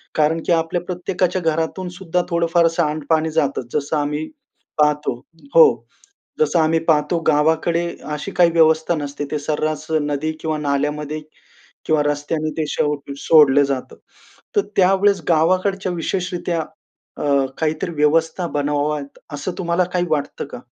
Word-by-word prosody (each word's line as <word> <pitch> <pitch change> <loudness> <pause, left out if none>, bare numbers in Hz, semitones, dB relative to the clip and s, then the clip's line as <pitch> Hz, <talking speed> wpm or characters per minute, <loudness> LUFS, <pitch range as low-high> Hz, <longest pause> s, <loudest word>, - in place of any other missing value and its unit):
कारण 155 +2 +2
की - - 0
आपल्या 165 +1 0
प्रत्येकाच्या 180 +1 -2
घरातून 165 +3 -1
सुद्धा 180 -1 0
थोडं 170 -1 +1
फार 170 -1 +5
सांडपाणी 155 0 0
जातंच. 140 -6 -1
जसं 150 +1 0
आम्ही 150 +1 -2 0.5
पाहतो 150 -3 +2 0.4
हो, 485 - +10 0.7
जसं 460 - +2
आम्ही 160 +1 +3
पाहतो 150 +1 +2
गावाकडे 160 +3 +2 0.3
अशी 150 - -5
काही 175 -1 +4
व्यवस्था 160 0 +3
नसते. 145 -1 -4
ते 150 - -1
सर्रास 155 +1 -2
नदी 145 +1 -2
किंवा 155 -1 -1
नाल्यामध्ये 150 +1 -2 0.6
किंवा 155 -2 +2
रस्त्याने 145 +2 -1
ते 160 - 0
सो 150 0 0 0.2
सोडलं 145 -2 +5
जातं. 135 -2 -4 0.6
तर - - +6 0.2
त्यावेळेस 195 0 +3
गावाकडच्या 185 +3 +2
विशेषरीत्या 175 0 -2 0.6
अ, - - -4 0.4
काहीतरी 160 +2 -1
व्यवस्था 160 +4 +1
बनवाव्यात 145 0 -1 0.2
असं 145 +6 -4
तुम्हाला 175 0 +1
काही 180 -1 +1
वाटतं 145 -2 -2
का? 140 - -9
160 Hz, 135 wpm, -20 LUFS, 150-170 Hz, 0.7 s, हो